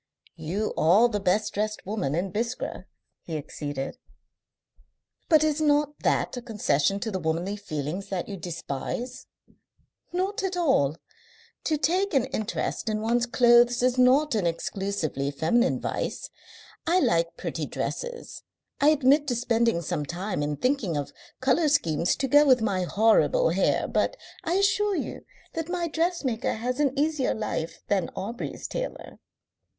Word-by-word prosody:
"You 180 +7 -2
are 195 +9 +5
the 210 -3 -1
best 200 +2 +1
dressed 215 +1 -2
woman 185 -9 -2
in 180 +3 -1
Biskra," 230 +5 -3 0.4
he 160 -2 -5
acceded. 145 -2 -5 1.3
"But 310 -2 +6
is 310 0 +1
not 295 -1 +2
that - - 0
a 245 - -5
concession 195 - 0
to 220 - -2
the 190 - -2
womanly 170 +4 -1
feelings 165 -1 -5
that 185 -3 -3
you 200 - -5
despise?" 180 - -5 0.8
"Not 375 +3 -1
at 375 -2 -2
all. 215 - +2 0.7
To 310 - +1
take 350 +5 +1
an 265 -2 +3
interest 225 -3 -3
in 215 0 -1
one's 235 +2 +1
clothes 240 0 +5
is 255 0 +2
not 270 +4 +4
an 205 -6 +1
exclusively 165 -5 -2
feminine 200 - +1
vice. - - -4 0.6
I 350 +3 +4
like 170 - +1
pretty - - -4
dresses. - - -5 0.4
I 290 - +5
admit 290 0 +4
to 245 - 0
spending 230 -6 +1
some 165 -2 -2
time 180 +1 -3
in 145 0 -2
thinking 230 - 0
of 145 - -4 0.3
colour 275 +5 +3
schemes 170 - +2
to 270 - -1
go 290 +3 +6
with 260 -4 +5
my 190 -4 0
horrible 225 - +3
hair, - - +1
but - - 0 0.3
I 335 - -1
assure 400 +1 +2
you - - -4 0.3
that 325 0 -4
my 350 -1 -1
dressmaker 325 -8 -1
has 245 +4 -3
an 280 -2 +1
easier 300 -2 +1
life 205 -6 -4
than 195 -4 +1
Aubrey's 230 +5 -5
tailor." - - -6
235 Hz, 150 wpm, -26 LUFS, 180-290 Hz, 1.3 s, But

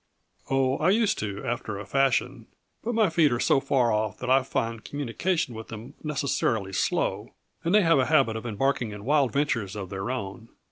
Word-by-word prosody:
"Oh, 135 0 +1
I 160 - +3
used 215 +1 +2
to, 100 -1 -4
after 115 -3 -3
a 100 - -7
fashion. 135 +5 0 0.4
But 235 +1 -2
my 215 -6 +3
feet 160 -3 +4
are 120 - 0
so 135 - +3
far 130 -4 +2
off 105 0 -1
that 125 - -3
I 135 +1 +6
find 115 -3 -3
communication 145 +2 -2
with 110 0 -8
them 115 +2 -9
necessarily 135 -9 -1
slow, - - -1 0.3
and 170 +4 +2
they 210 - +6
have 165 -4 +4
a 130 - +2
habit 135 -8 +3
of 110 +2 -5
embarking 120 +2 0
in 105 0 -9
wild 140 -3 +3
ventures 120 -8 -1
of 95 -3 -6
their 95 +4 -4
own. 110 -2 -5
125 Hz, 195 wpm, -26 LUFS, 110-145 Hz, 0.4 s, I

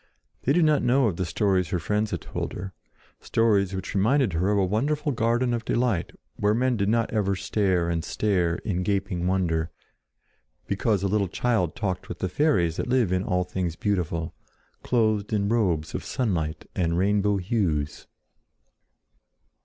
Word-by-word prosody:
They 140 - +2
did 175 0 +4
not 150 -1 +3
know 130 +2 +3
of 95 -7 0
the 95 - -1
stories 95 -1 +1
her 90 - 0
friends 105 +5 -1
told - - -5
her, 95 +1 -6 0.5
stories 100 -4 +1
which 95 - -5
reminded 115 - +2
her 90 +4 +1
of 105 - +2
a 95 - +3
wonderful 145 - 0
garden 120 +1 +1
of 115 -1 -2
delight 120 -6 0 0.3
where 105 +1 +2
men 125 +1 +1
did 100 -2 0
not 115 +1 +1
ever 100 -3 +1
stare 95 -3 0
and 85 -1 -1
stare 90 -4 0
in 90 -3 -1
gaping 95 -2 -1
wonder 85 -4 0 1.0
because 100 0 0
a - - +2
little 100 0 +1
child 95 -3 0
talked 95 -5 -3
with - - -5
the 95 - -2
fairies 90 - +1
that - - -2
live 125 -7 +2
in 90 0 +1
all 90 -1 0
things 90 -2 -3
beautiful, 85 -5 -1 0.5
clothed 110 -4 +1
in 100 -1 +1
robes 90 -9 0
of - - -4
sunlight 85 -11 -2
and 85 -2 0
rainbow 100 +2 +2
hues. 90 -8 -1
100 Hz, 165 wpm, -25 LUFS, 90-115 Hz, 1.0 s, did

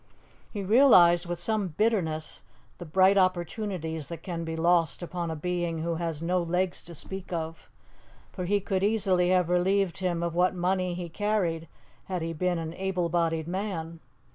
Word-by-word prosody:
He 205 -3 -4
realized 185 -6 +6
with 175 0 -3
some 205 +3 -1
bitterness 175 -8 0 0.4
the 175 - -7
bright 190 +4 +4
opportunities 175 -3 -1
that 165 -1 -8
can 170 -3 -4
be 160 0 -4
lost 170 0 +2
upon 175 -1 -4
a 160 - -3
being 170 0 -2
who 165 -1 -1
has 165 -2 -3
no 180 +1 +1
legs 180 +2 -1
to 170 - -10
speak 190 +5 -8
of; 165 -1 -5 0.6
for 180 - -5
he 205 +3 +2
could 195 -1 -1
easily 195 -4 +2
have 180 -2 +3
relieved 180 +1 +1
him 175 -2 -1
of 170 -1 -2
what 180 +2 +2
money 180 0 0
he 175 -1 -5
carried 175 -3 -1 0.4
had 180 -3 -3
he 165 0 -3
been 180 +2 0
an 165 0 -4
able 185 -2 -1
bodied 165 -2 0
man. 170 -3 -4
175 Hz, 170 wpm, -28 LUFS, 165-190 Hz, 0.6 s, realized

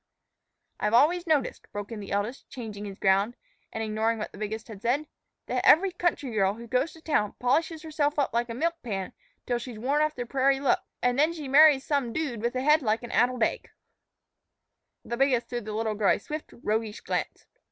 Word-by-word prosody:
"I've 210 +2 +1
always 340 +8 +4
noticed," 300 -5 0
broke 205 +1 -6
in 225 - -5
the 200 - -8
eldest, 205 +6 -3
changing 215 -5 -7
his 195 -1 -7
ground, 195 +4 +2 0.4
and 225 - -3
ignoring 220 +1 0
what 215 - -5
the - - -12
biggest 215 +1 -4
said, 240 +7 -1 0.4
"that - - -1
every 380 +4 +6
country 345 -7 -1
girl 200 -2 +1
who 235 +1 -9
goes 255 +6 0
to 320 - -15
town 210 -10 0
polishes 320 +6 +1
herself 300 -2 -1
up 285 - +1
like 235 +1 0
a 230 - -4
milk 335 +5 -1
pan 195 -6 -4 0.3
till 245 -1 0
she's 240 -2 -8
worn 275 +7 +1
off 305 0 +1
the 245 - -4
prairie 270 +2 +2
look, 275 - +2 0.2
an' 245 0 +2
then 310 +4 +3
she 305 -4 -6
marries 285 0 +6
some 275 -6 0
dude 275 -9 -2
with 235 +2 -1
a 255 - 0
head 300 +2 +5
like 225 -1 0
an 240 - -7
addled 245 -1 +2
egg." - - -1 1.4
The 235 - -4
biggest 255 -3 +2
threw 240 -1 -3
the 215 -1 -6
little 220 0 -1
girl 210 -1 +3
a - - -5
swift, 305 0 -7
roguish 215 0 -1
glance. - - -3
245 Hz, 205 wpm, -27 LUFS, 220-295 Hz, 1.4 s, every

